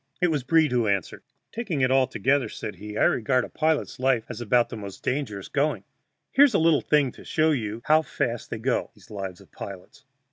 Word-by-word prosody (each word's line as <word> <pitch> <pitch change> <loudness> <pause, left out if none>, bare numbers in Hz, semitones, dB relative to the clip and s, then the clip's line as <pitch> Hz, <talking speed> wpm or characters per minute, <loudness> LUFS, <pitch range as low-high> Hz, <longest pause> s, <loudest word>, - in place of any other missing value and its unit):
It 180 -2 +3
was 150 -4 0
Breed 155 +2 +3
who 120 -3 +1
answered: 100 -4 -1 0.3
"Taking 205 - -3
it 130 0 +3
altogether," 130 +1 +2
said 105 -4 -7
he, 105 +3 -7
"I - - +3
regard 125 +2 +2
a - - -11
pilot's 155 -4 -1
life 130 -3 +2
as 120 -1 -6
about 120 +1 +2
the - - -6
most 100 -3 -9
dangerous 125 -8 -2
going. 145 +2 0 0.5
Here's 280 -4 +5
a - - +6
little 160 -2 +4
thing 145 -4 +2
to - - -14
show 155 0 +2
you 115 -4 -3
how 155 +1 +5
fast 120 -6 -3
they - - -4
go, 120 +3 -1
these - - -19
lives 95 -3 -6
of - - -19
pilots. 100 +8 -10
130 Hz, 210 wpm, -25 LUFS, 110-150 Hz, 0.5 s, a